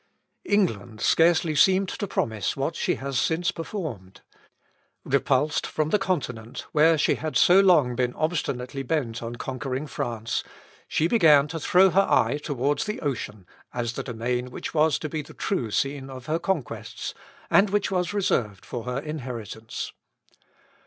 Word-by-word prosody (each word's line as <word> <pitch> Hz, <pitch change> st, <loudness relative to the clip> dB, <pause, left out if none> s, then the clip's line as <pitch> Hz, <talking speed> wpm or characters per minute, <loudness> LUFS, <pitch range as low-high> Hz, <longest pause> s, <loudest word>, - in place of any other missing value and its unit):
England 120 Hz, -, 0 dB
scarcely 165 Hz, +3 st, +3 dB
seemed 190 Hz, +6 st, +4 dB
to 205 Hz, -, -4 dB
promise 110 Hz, -, -1 dB
what -, -, -1 dB
she -, -, 0 dB
has 135 Hz, -2 st, -2 dB
since 170 Hz, +2 st, +1 dB
performed. 155 Hz, -, -6 dB, 0.8 s
Repulsed 140 Hz, +2 st, +1 dB
from 155 Hz, 0 st, -1 dB
the 210 Hz, -, +3 dB
Continent, 125 Hz, -12 st, -3 dB
where 160 Hz, +2 st, +5 dB
she 150 Hz, -, +3 dB
had 155 Hz, -1 st, -2 dB
so 180 Hz, +2 st, +6 dB
long 165 Hz, -11 st, +4 dB
been 125 Hz, 0 st, -1 dB
obstinately 140 Hz, -5 st, -2 dB
bent 125 Hz, -5 st, -2 dB
on 115 Hz, 0 st, -5 dB
conquering 130 Hz, +2 st, -4 dB
France, 115 Hz, -5 st, -3 dB, 0.4 s
she 160 Hz, -, +1 dB
began 155 Hz, -9 st, +5 dB
to 165 Hz, -, -4 dB
throw 185 Hz, +4 st, +5 dB
her 195 Hz, +2 st, +3 dB
eye 145 Hz, -, +3 dB
towards 145 Hz, +1 st, 0 dB
the 210 Hz, -, -3 dB
ocean, 110 Hz, -, -4 dB, 0.3 s
as 120 Hz, -1 st, -2 dB
the -, -, -4 dB
domain 125 Hz, +1 st, -3 dB
which -, -, -6 dB
was 155 Hz, -1 st, +3 dB
to 155 Hz, -, -4 dB
be 155 Hz, +1 st, -3 dB
the -, -, -14 dB
true 130 Hz, -, -1 dB
scene 135 Hz, +4 st, -1 dB
of 130 Hz, -1 st, -9 dB
her 160 Hz, +4 st, 0 dB
conquests, 170 Hz, -, -3 dB, 0.4 s
and 200 Hz, +1 st, +5 dB
which 205 Hz, 0 st, 0 dB
was 180 Hz, -2 st, 0 dB
reserved 115 Hz, -, -1 dB
for 120 Hz, -2 st, -6 dB
her 125 Hz, 0 st, -2 dB
inheritance. 125 Hz, -7 st, -6 dB
145 Hz, 155 wpm, -25 LUFS, 120-165 Hz, 0.8 s, so